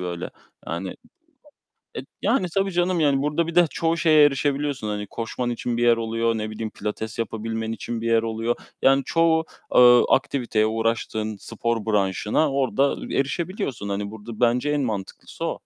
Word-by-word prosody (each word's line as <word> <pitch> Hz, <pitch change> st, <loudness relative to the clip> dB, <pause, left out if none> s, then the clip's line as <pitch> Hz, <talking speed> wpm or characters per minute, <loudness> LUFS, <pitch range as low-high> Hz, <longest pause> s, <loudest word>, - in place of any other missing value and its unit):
böyle, 90 Hz, -1 st, -4 dB, 0.4 s
yani. 90 Hz, +3 st, -4 dB, 1.0 s
E, -, -, -1 dB, 0.2 s
yani, 190 Hz, -9 st, +1 dB
tabii, 195 Hz, 0 st, +1 dB
canım, 175 Hz, 0 st, +1 dB
yani, 140 Hz, -3 st, +3 dB
burada 150 Hz, +3 st, 0 dB
bir 170 Hz, -, -5 dB
de 175 Hz, -2 st, +6 dB
çoğu 165 Hz, +2 st, 0 dB
şeye 155 Hz, -3 st, +6 dB
erişebiliyorsun, 140 Hz, -3 st, 0 dB
hani, 105 Hz, -1 st, -3 dB
koşman 120 Hz, +3 st, -4 dB
için 120 Hz, 0 st, -2 dB
bir 120 Hz, -, +1 dB
yer 120 Hz, -1 st, +5 dB
oluyor, 115 Hz, 0 st, 0 dB
ne 110 Hz, 0 st, -3 dB
bileyim, 110 Hz, 0 st, -5 dB
pilates 105 Hz, +1 st, -5 dB
yapabilmen 115 Hz, 0 st, -3 dB
için 115 Hz, +1 st, -5 dB
bir 115 Hz, -, -2 dB
yer 115 Hz, -1 st, +3 dB
oluyor. 115 Hz, +1 st, -1 dB, 0.3 s
Yani, 135 Hz, 0 st, +4 dB
çoğu, 165 Hz, -1 st, +2 dB, 0.3 s
ııı, 125 Hz, -1 st, +8 dB
aktiviteye, 125 Hz, -6 st, +1 dB
uğraştığın 110 Hz, -1 st, -1 dB
spor 115 Hz, 0 st, -3 dB
branşına 105 Hz, -, +1 dB
orada 135 Hz, +1 st, +1 dB, 0.2 s
erişebiliyorsun. 140 Hz, -, -2 dB
Hani, 100 Hz, +1 st, -3 dB
burada 110 Hz, +1 st, -9 dB
bence 125 Hz, +3 st, +2 dB
en 145 Hz, -1 st, +1 dB
mantıklısı 105 Hz, -6 st, -5 dB
o. -, -, -1 dB
115 Hz, 160 wpm, -23 LUFS, 110-145 Hz, 1.0 s, ııı